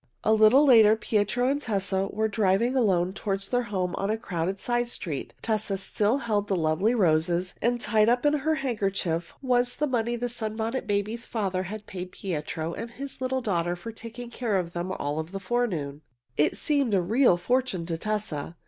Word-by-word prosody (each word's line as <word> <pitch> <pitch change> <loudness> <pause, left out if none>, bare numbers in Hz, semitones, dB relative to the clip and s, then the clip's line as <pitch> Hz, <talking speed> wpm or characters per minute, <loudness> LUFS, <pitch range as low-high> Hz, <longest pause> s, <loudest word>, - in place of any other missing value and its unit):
A 220 - +4
little 220 +7 +6
later 220 -5 +7
Pietro 220 +3 0
and 285 +2 0
Tessa 195 -4 0
were 220 +1 0
driving 215 +4 +1
alone 190 -7 +2
toward 195 -1 -2
their 245 +5 0
home 185 -3 -1
on 195 - -1
a 220 - +1
crowded 190 -3 -3
side 240 +1 0
street. 165 - -4
Tessa 215 -3 0
still 210 +5 +1
held 215 -6 -1
the 195 - +1
lovely 170 +8 +1
roses, 175 -2 +2
and 240 +1 +1
tied 220 -1 +3
up 245 +3 +2
in 295 - +4
her 305 +2 +1
handkerchief 195 - -2
was 245 -1 +2
the 300 - 0
money 240 -3 0
the 240 +1 -2
Sunbonnet 225 +1 -3
Babies' 210 +3 -1
father 195 -5 -1
had 205 +3 -6
paid 180 -1 -7
Pietro 160 -2 -4
and 230 - -6
his 265 +2 -6
little 260 0 -1
daughter 175 -5 0
for 175 +6 -8
taking 230 +2 -9
care 230 -5 -1
of 175 -2 -3
them 175 +2 -3
all 150 -3 -2
the 180 +5 -7
forenoon. 185 -10 -2 0.3
It 150 - +2
seemed 280 -8 +1
a - - +4
real 220 +1 +3
fortune 245 -2 0
to 165 -1 -2
Tessa. 205 -8 -3
210 Hz, 185 wpm, -27 LUFS, 185-240 Hz, 0.3 s, later